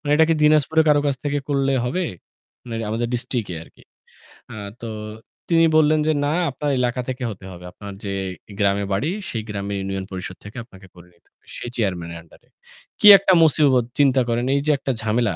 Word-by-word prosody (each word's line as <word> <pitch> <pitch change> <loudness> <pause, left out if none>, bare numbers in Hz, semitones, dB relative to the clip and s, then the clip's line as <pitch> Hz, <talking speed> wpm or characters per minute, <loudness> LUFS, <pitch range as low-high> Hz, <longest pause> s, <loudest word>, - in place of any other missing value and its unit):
"মানে 145 - -4
এটা 160 - +6
কি 165 - +3
দিনাজপুরে 155 +1 +4
কারো 145 -1 +5
কাছ 140 - +1
থেকে 145 0 0
করলে 135 -1 +1
হবে?" 180 +10 -1 0.7
মানে - - -4 0.2
আমাদের 115 +2 -1
ডিস্ট্রিক্ট 120 -2 -2
এ - - -6
আরকি। - - -21 0.7
আ - - -8 0.3
তো 115 - -5 0.6
তিনি 165 -1 +5
বললেন 155 0 +4
যে, - - +4
"না 145 - 0 0.2
আপনার 145 +2 -3
এলাকা 125 0 0
থেকে 130 0 -4
হতে 100 -3 -9
হবে। 90 0 -11
আপনার 100 +2 -10
যে 100 - -3 0.5
গ্রামে 100 0 +1
বাড়ি 135 - 0 0.2
সেই 115 -7 -3
গ্রামের 100 -1 -4
ইউনিয়ন 95 0 -4
পরিষদ 95 0 -6
থেকে 105 - -10
আপনাকে 95 -5 -16
করে 90 0 -15
নিতে 85 - -32
হবে। - - -40
সেই 120 - -6
চেয়ারম্যান 90 -7 -2
এর 85 - -7
আন্ডার 80 - -20
এ।" - - -34 0.5
কী - - +6
একটা 190 0 +2
মুসিবত 140 -5 +4
চিন্তা 135 -2 +4
করেন, 120 +1 0
এই 140 - +1
যে 155 - +3
একটা 135 - -3
ঝামেলা 110 -2 0
120 Hz, 205 wpm, -22 LUFS, 100-145 Hz, 0.7 s, এটা